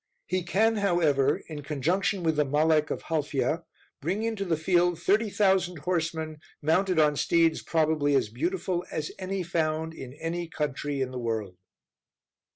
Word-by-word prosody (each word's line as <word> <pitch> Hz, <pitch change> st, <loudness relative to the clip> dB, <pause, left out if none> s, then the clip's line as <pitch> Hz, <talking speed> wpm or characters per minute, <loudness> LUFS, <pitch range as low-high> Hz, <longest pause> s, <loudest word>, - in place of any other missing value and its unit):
He 185 Hz, -, -1 dB
can, 215 Hz, +6 st, +2 dB
however, 170 Hz, -9 st, +2 dB
in 150 Hz, -2 st, -6 dB
conjunction 170 Hz, +7 st, 0 dB
with 160 Hz, -1 st, +2 dB
the 150 Hz, -, +3 dB
Malek 155 Hz, +2 st, +2 dB
of -, -, -3 dB
Halfya, 155 Hz, +1 st, -1 dB, 0.4 s
bring 185 Hz, +9 st, -1 dB
into 225 Hz, -3 st, -1 dB
the 165 Hz, -3 st, 0 dB
field 175 Hz, +1 st, +2 dB
thirty 210 Hz, +5 st, +2 dB
thousand 190 Hz, -3 st, +2 dB
horsemen, 160 Hz, -1 st, -2 dB, 0.2 s
mounted 180 Hz, +4 st, +2 dB
on 150 Hz, -2 st, +4 dB
steeds 165 Hz, +2 st, +2 dB
probably 155 Hz, -3 st, +1 dB
as 120 Hz, -, +2 dB
beautiful 175 Hz, -, -2 dB
as 155 Hz, -1 st, -3 dB
any 190 Hz, 0 st, -2 dB
found 160 Hz, -1 st, -1 dB
in 130 Hz, -5 st, -9 dB
any 170 Hz, +2 st, -3 dB
country 145 Hz, -2 st, -3 dB
in 130 Hz, -1 st, -1 dB
the 130 Hz, -, -5 dB
world. 110 Hz, -5 st, -3 dB
160 Hz, 155 wpm, -27 LUFS, 150-180 Hz, 0.4 s, on